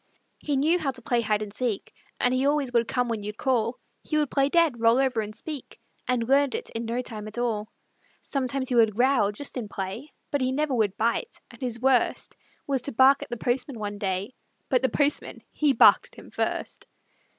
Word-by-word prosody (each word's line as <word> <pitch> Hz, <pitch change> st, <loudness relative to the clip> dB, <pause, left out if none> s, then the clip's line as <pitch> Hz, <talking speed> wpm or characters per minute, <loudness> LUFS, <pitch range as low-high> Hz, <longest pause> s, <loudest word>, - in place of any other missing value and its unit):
He 290 Hz, -2 st, -1 dB
knew 320 Hz, +6 st, +3 dB
how 300 Hz, -4 st, -1 dB
to 255 Hz, -2 st, -4 dB
play 240 Hz, 0 st, +1 dB
hide 215 Hz, -1 st, 0 dB
and 205 Hz, -1 st, -8 dB
seek 230 Hz, -4 st, -3 dB, 0.3 s
And 250 Hz, -, +2 dB
he 260 Hz, +2 st, +2 dB
always 285 Hz, -3 st, +1 dB
would 235 Hz, -1 st, +2 dB
come 250 Hz, -1 st, 0 dB
when 225 Hz, -3 st, -2 dB
you'd 210 Hz, +1 st, -6 dB
call; 245 Hz, -3 st, 0 dB, 0.3 s
He 305 Hz, -, -1 dB
would 295 Hz, -3 st, 0 dB
play 275 Hz, 0 st, +2 dB
dead, 325 Hz, -7 st, +3 dB
roll 230 Hz, +1 st, +4 dB
over 260 Hz, -4 st, +1 dB
and 215 Hz, 0 st, -7 dB
speak, 290 Hz, +3 st, -7 dB, 0.3 s
And 245 Hz, -2 st, 0 dB
learned 275 Hz, 0 st, +3 dB
it -, -, -4 dB
in 230 Hz, +1 st, -4 dB
no 235 Hz, +2 st, -2 dB
time 215 Hz, -3 st, -7 dB
at 215 Hz, -, -7 dB
all. 225 Hz, -3 st, -2 dB, 0.5 s
Sometimes 265 Hz, -1 st, -2 dB
he -, -, -1 dB
would 225 Hz, -3 st, +4 dB
growl, 245 Hz, -4 st, +3 dB
just 275 Hz, +6 st, -5 dB
in 235 Hz, -4 st, -4 dB
play, 195 Hz, +10 st, -6 dB, 0.2 s
But 285 Hz, -, 0 dB
he 255 Hz, 0 st, +1 dB
never 295 Hz, +1 st, 0 dB
would 210 Hz, -5 st, 0 dB
bite, 235 Hz, -, -1 dB
and -, -, -16 dB
his 240 Hz, -2 st, -2 dB
worst 260 Hz, 0 st, +1 dB, 0.3 s
Was 270 Hz, -3 st, 0 dB
to 280 Hz, -, -4 dB
bark 265 Hz, +3 st, +5 dB
at -, -, -7 dB
the 240 Hz, -, -4 dB
postman 250 Hz, +2 st, -1 dB
one 205 Hz, -1 st, -5 dB
day, 195 Hz, +3 st, -2 dB, 0.4 s
But 255 Hz, -, +3 dB
the 260 Hz, -, +2 dB
postman, 285 Hz, +5 st, 0 dB
he 300 Hz, -2 st, +2 dB
barked 245 Hz, -, +6 dB
at -, -, -18 dB
him -, -, -13 dB
first. -, -, -3 dB
245 Hz, 215 wpm, -26 LUFS, 225-275 Hz, 0.5 s, barked